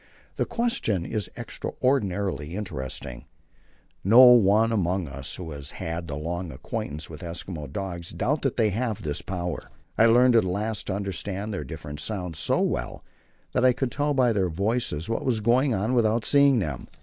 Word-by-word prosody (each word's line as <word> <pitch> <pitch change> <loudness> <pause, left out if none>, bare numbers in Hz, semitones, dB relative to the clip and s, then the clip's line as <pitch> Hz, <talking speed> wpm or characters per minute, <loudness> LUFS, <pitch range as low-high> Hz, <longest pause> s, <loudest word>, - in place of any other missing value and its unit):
The - - 0
question 230 - 0
is 105 -4 -3
extraordinarily 95 - -1
interesting. 65 - -5 0.8
No 115 +7 +8
one 110 -1 +5
among 95 -4 0
us, 70 0 -5
who 85 -3 -7
has 70 -1 -7
had 85 -2 -4
long 85 +4 -4
acquaintance 75 +3 -5
with 80 +1 -10
Eskimo 85 -4 -6
dogs, 85 -2 -5
doubts 135 - -1
that 135 - -1
they 110 -3 +3
have 110 0 -2
this 75 -2 -2
power. 90 -2 -4 0.3
I 115 - +7
learned 120 +1 +5
at 115 - +6
last 105 +4 -2
to 95 - -1
understand 100 +1 -3
their 95 - -3
different 75 -2 -7
sounds 90 -3 -3
so 80 - +1
well - - -2 0.5
that 125 - +1
I 130 -1 +6
could 130 0 -2
tell 145 0 0
by 125 -3 +3
their 95 -3 +1
voices 100 -3 -1
what 115 - -2
was 120 -4 +1
going 120 +4 +3
on 105 +6 0
without 115 -2 +2
seeing 140 -2 +5
them. 75 - -3
100 Hz, 170 wpm, -26 LUFS, 85-115 Hz, 0.8 s, No